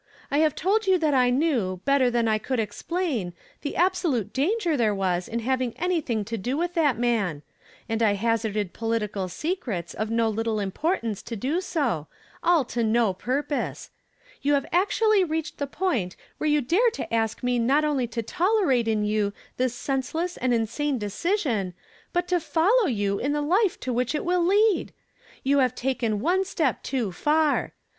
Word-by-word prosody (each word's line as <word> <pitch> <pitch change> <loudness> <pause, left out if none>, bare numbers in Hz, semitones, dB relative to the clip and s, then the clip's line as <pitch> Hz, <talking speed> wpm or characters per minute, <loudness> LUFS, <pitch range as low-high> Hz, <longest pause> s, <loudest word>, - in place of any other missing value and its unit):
I 285 - +2
have 310 -2 +3
told 405 +4 +1
you 380 -1 +5
th 310 -4 +1
icnew, 245 - +1
better 275 -2 +4
than 235 -1 +1
I 215 -1 +2
could 255 +3 -2
exi)lain, 230 - -2 0.3
the 290 - -4
absolut 340 - +1
tanger 340 +4 +1
there 220 -6 +2
was 180 -2 -1
in 235 +1 -3
having 255 0 -1
anything 315 - -1
to 225 +1 -4
do 250 +8 -2
with 350 +2 -1
that 300 -8 +2
man; 215 -11 0 0.4
and 225 0 -1
I 215 -3 +4
hazarded 215 -2 -1
political 215 -4 -2
secrets 215 - -3
of 215 +1 -3
no 230 0 +2
little 220 0 -1
importance 220 - -1
to 230 - -6
do 280 - -1
so, 250 - -1 0.3
all 335 -6 +3
to 235 0 -2
no 225 -2 +2
purpose. 270 +9 -3 0.5
You 285 +1 +3
have 275 - 0
actually 410 +3 +3
reached 320 -2 -3
the 285 - -1
point 255 - -1 0.2
whci 310 - 0
e - - +3
you 295 0 +3
dare 370 - +3
to 335 - -6
ask 225 0 0
me 245 -1 +1
not 270 +6 +3
oidy 275 -6 0
to 230 0 -3
tolerate 335 - +2
in 215 -1 +1
you 210 -1 0 0.2
this 255 -1 0
senseless 285 +8 -2
and 255 - -1
insane 245 +5 0
decision, 220 - -1 0.4
but 355 0 0
to 360 -1 +3
follow 360 +8 +2
you 200 -5 0
in 280 +3 0
the 295 - 0
life 370 +5 +2
to 255 - -2
which 250 +4 0
it 300 - -2
will 355 0 +2
lead! 410 +3 +3 0.5
You 280 +1 +3
have 255 -3 +2
taken 235 -5 -1
one 365 +7 +2
step 325 -8 -1
too 245 -7 -2
far. 300 - +1
255 Hz, 180 wpm, -25 LUFS, 225-330 Hz, 0.5 s, you